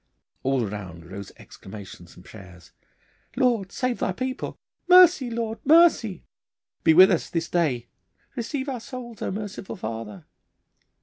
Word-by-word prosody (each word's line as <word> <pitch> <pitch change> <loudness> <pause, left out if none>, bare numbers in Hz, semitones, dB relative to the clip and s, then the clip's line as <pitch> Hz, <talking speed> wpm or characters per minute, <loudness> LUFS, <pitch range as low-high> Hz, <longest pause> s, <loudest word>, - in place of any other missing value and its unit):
All 130 -3 0
round 90 -5 -8
rose 100 +3 -9
exclamations 95 -3 -12
and 90 - -16
prayers. 95 -5 -14 0.6
'Lord, 240 -7 +1
save 250 -2 -2
Thy - - 0
people!' 260 +6 -4 0.3
'Mercy, 360 -8 +7
Lord, 230 -1 -3
mercy!' 300 - +4 0.6
'Be 160 - +5
with 185 +3 +8
us 175 - 0
this 165 -1 -2
day!' 135 -9 0 0.5
'Receive 265 +3 -3
our 260 -3 -3
souls, 240 -1 -9
O - - -2
merciful 205 0 -6
Father! 110 - -7
190 Hz, 130 wpm, -25 LUFS, -, 0.6 s, with